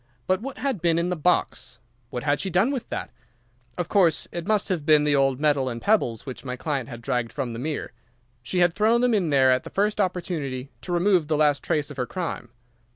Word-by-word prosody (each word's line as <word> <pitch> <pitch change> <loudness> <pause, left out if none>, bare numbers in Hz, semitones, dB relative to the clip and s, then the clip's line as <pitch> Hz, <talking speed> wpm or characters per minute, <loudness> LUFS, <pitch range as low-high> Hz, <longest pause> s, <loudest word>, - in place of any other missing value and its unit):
But 185 +1 +1
what 275 +3 -6
had 255 - -2
been 170 -1 +2
in 170 +1 0
the - - 0
box? 170 -5 0 0.3
What 125 0 -5
had 145 0 +1
she 195 - -2
done 190 +9 +2
with 265 -4 -4
that? - - -5 0.7
Of 175 - -2
course, 175 -6 +2
it 170 +1 -5
must 215 -2 +1
have 175 -5 -1
been 150 -1 +5
the 150 -1 +2
old 135 -1 +2
metal 145 -3 +2
and 120 -1 -5
pebbles 120 - +1
which 130 - -7
my 125 -2 -4
client 140 -1 -3
had 120 -2 -9
dragged 120 -1 -1
from 130 -4 -4
the 115 - -6
mere. 150 +3 -4 0.5
She 180 +9 -1
had 175 -1 +4
thrown 220 +4 +3
them 250 -1 +3
in 190 -7 +1
there 135 -2 +5
at 130 - +2
the - - -10
first 210 +1 0
opportunity 155 -8 -3
to 180 - -6
remove 175 -2 +2
the 155 -1 +1
last 150 -2 +3
trace 150 -1 -1
of 145 - -10
her 125 -2 -2
crime. 170 -9 -4
155 Hz, 230 wpm, -25 LUFS, 135-185 Hz, 0.7 s, been